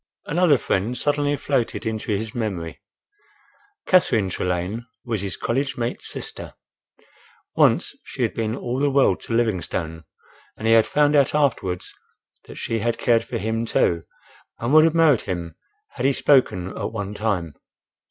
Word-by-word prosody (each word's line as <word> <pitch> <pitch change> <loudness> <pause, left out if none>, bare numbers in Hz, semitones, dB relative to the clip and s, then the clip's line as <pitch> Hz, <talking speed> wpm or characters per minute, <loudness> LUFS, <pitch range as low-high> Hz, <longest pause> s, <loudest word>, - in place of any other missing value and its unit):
Another 165 -2 +3
friend 110 +2 -1
suddenly 145 0 0
floated 130 -6 -1
into 110 -1 -3
his 110 +2 -2
memory. 95 -8 -4 1.0
Catherine 110 - +3
Trelane 90 +8 -2 0.2
was 115 -5 -2
his 100 -2 -3
college 135 +3 -1
mate's 120 0 -3
sister. - - -7 1.0
Once - - +3
she - - -4
had - - 0
been 110 0 -2
all 125 +1 -3
the 145 +1 +2
world 140 0 +3
to - - -6
Livingstone, 90 -8 -1 0.5
and 110 - -6
he 115 - +5
had 115 -1 +5
found 150 0 +3
out 140 0 +3
afterwards 115 -12 0 0.5
that - - -11
she 115 - -2
had 115 +1 -1
cared 115 -2 +2
for - - -4
him 110 +3 -1
too, 85 -6 +1 0.6
and 120 +4 -2
would 155 0 +8
have 165 0 +2
married 160 -7 +5
him 85 -2 -3 0.4
had - - -1
he 140 - +3
spoken 125 -11 +2
at - - -4
one 105 -2 -4
time. 100 -7 -2
115 Hz, 155 wpm, -23 LUFS, 100-140 Hz, 1.0 s, would